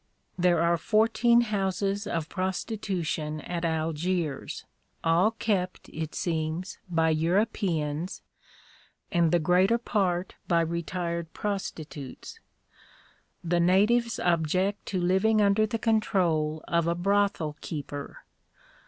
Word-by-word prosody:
There 175 -1 +3
are 170 0 +3
fourteen 230 +5 +4
houses 200 -2 -1
of 165 -2 -2
prostitution 185 -5 -2
at 175 +1 -4
Algiers, 160 -1 -2 0.4
all 165 +5 +4
kept, 205 -5 -2
it 160 -1 -5
seems, 165 +2 -2
by 165 -2 +2
Europeans, 170 -2 0 0.9
and 170 -3 +3
the 175 - +5
greater 180 +7 +3
part 190 -6 -1
by 170 -2 +3
retired 170 0 -3
prostitutes. 155 -9 -5 1.0
The 175 0 +1
natives 210 +7 +3
object 180 +4 0
to 190 - -1
living 190 +5 +3
under 210 +1 +3
the 230 - -2
control 175 -9 +1
of 170 -1 +1
a 170 - +1
brothel 195 -4 +1
keeper. 145 - -6
180 Hz, 105 wpm, -27 LUFS, 165-200 Hz, 1.0 s, the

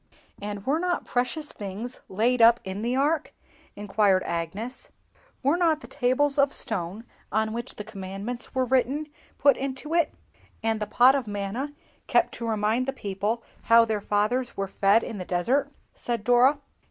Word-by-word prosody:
_'" - - -28 0.3
"And 205 -1 -5
were 290 +4 +1
not 355 0 -1
precious 250 +5 -1
things 210 +4 -7
laid 235 +5 +2
up 230 +1 +7
in 190 +2 -5
the 240 +3 0
Ark?" 295 +3 +1 0.4
inquired 205 -2 +2
Agnes. 190 +9 -4 0.5
"Were 285 +6 +3
not 325 -3 +2
the - - -10
tables 275 +3 +1
of 280 0 +4
stone 195 +1 -3 0.3
on 220 0 0
which 235 +2 -5
the 210 - -6
Commandments 205 +4 -6
were 260 0 +2
written 265 +4 +1 0.3
put 280 -2 +5
into 275 +3 -4
it?" 335 -3 +3 0.5
"And 225 -1 +1
the 210 - -3
Pot 250 +2 +6
of 270 -5 -1
Manna, 205 +8 -3 0.3
kept - - +2
to 235 - -5
remind 220 +4 +1
the 270 - -1
people 210 0 -2 0.2
how 230 0 +7
their 215 -2 -1
fathers 215 +5 0
were 195 0 -1
fed 200 +3 +3
in 220 -4 -5
the - - -3
desert?" 250 +12 0 0.2
said 235 -3 -3
Dora. 245 +5 +5
235 Hz, 170 wpm, -26 LUFS, 205-270 Hz, 0.5 s, up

